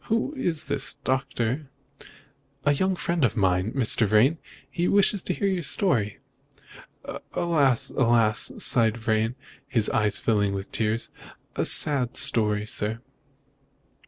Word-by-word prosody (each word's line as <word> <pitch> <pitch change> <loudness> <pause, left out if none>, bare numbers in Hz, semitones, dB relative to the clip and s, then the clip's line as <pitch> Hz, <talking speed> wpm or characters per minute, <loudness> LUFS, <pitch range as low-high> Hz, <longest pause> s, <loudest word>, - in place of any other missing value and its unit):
"Who 230 +5 -1
is 170 - -2
this, 135 -1 -2
Doctor?" 130 +1 -3 1.0
"A 145 - +3
young 190 +6 0
friend 170 -2 -2
of 120 -1 +1
mine, 95 +1 +1
Mr. 115 -4 +2
Vrain. 120 +10 +3 0.3
He 175 0 -2
wishes 200 0 +2
to - - -1
hear 200 - -1
your 190 -2 -1
story." 140 - +1 1.2
"Alas! 145 -8 +1
alas!" 115 -3 +2
sighed 115 -2 +3
Vrain, 110 +1 -1 0.3
his 115 -6 +1
eyes 105 -2 +1
filling 100 -3 0
with 95 0 -7
tears, 110 +1 -1 0.4
"a - - -1
sad 135 -5 +2
story, 110 -7 +1
sir." 110 +1 +1
120 Hz, 130 wpm, -24 LUFS, 110-155 Hz, 1.2 s, A